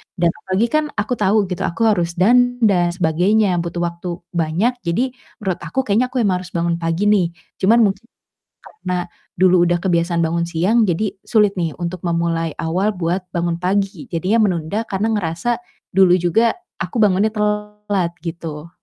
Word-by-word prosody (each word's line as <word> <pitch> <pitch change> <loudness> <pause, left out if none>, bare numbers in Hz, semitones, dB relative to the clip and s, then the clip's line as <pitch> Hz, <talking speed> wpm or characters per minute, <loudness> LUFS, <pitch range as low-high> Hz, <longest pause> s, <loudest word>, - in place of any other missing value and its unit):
Dan 170 -2 +2
apalagi 190 +6 -1
kan 310 0 +2
aku 210 +3 -1
tahu 205 +1 +3
gitu, 180 +2 -1
aku 200 +7 -2
harus 170 -4 -1
dandan 245 +7 +4
dan 185 -5 +4
sebagainya, 180 +3 +2
butuh 170 0 -3
waktu 170 +1 -4 0.2
banyak. 175 +9 0
Jadi 235 +8 -1 0.3
menurut 185 -3 -1
aku 265 - -2
kayaknya 230 +2 +1
aku 250 -1 -1
emang 185 -3 +1
harus 180 -1 -11
bangun 170 0 0
pagi 165 +3 -1
nih, 195 -5 +3 0.3
cuman 225 +5 +4
mungkin 200 +1 0 0.6
karena 180 - -5 0.3
dulu 180 -1 +5
udah 175 0 +1
kebiasaan 170 -2 +1
bangun 170 +1 0
siang 185 +7 +2
jadi 190 +3 -1
sulit 210 -3 +2
nih 165 -4 -1
untuk 175 +1 -4
memulai 170 -1 0
awal 185 +6 0
buat 180 0 -2
bangun 170 -1 -1
pagi. 190 0 -1
Jadinya 185 +6 +1
menunda 185 +3 -1
karena 205 +2 -1
ngerasa 205 +4 -1 0.3
dulu 190 -1 +5
juga 225 +7 +2 0.3
aku 180 +7 -3
bangunnya 210 +1 +3
telat 210 -3 -1
gitu. 165 -2 -6
185 Hz, 165 wpm, -19 LUFS, 170-210 Hz, 0.6 s, dulu